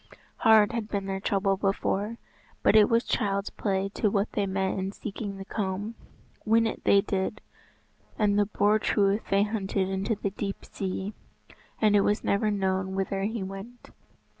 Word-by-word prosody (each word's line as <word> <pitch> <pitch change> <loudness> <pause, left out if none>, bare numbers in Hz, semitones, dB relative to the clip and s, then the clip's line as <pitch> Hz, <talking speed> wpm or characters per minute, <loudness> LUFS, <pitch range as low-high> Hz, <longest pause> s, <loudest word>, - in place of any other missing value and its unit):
Hard 220 -3 +5
had 230 -2 -3
been 200 -2 -2
their 195 0 -3
trouble 195 0 +1
before, 200 +2 -1 0.5
but - - +5
it 210 -1 +7
was 230 +1 +3
child's 200 -1 -1
play 195 -2 -1
to 210 +1 0
what 200 +1 0
they 200 -1 0
met 190 0 -1
in 190 +1 -2
seeking 205 -1 -6
the 195 - -7
comb. 200 +2 -3 0.5
Win 225 +1 +3
it 225 - -3
they 200 - +6
did, 195 +1 -2 0.8
and 205 -1 +2
the 205 - +2
Boar 210 +1 +2
Truith 200 0 +2
they 195 +1 +4
hunted 200 -3 -1
into 195 +4 -1
the 200 -1 -3
deep 200 0 -5
sea, 190 +1 -4 0.7
and 210 -1 +4
it 205 - +6
was 205 +2 +1
never 205 +2 +1
known 190 -2 -1
whither 195 0 -1
he 220 -1 -2
went. 195 +6 -9
200 Hz, 170 wpm, -27 LUFS, 195-215 Hz, 0.8 s, it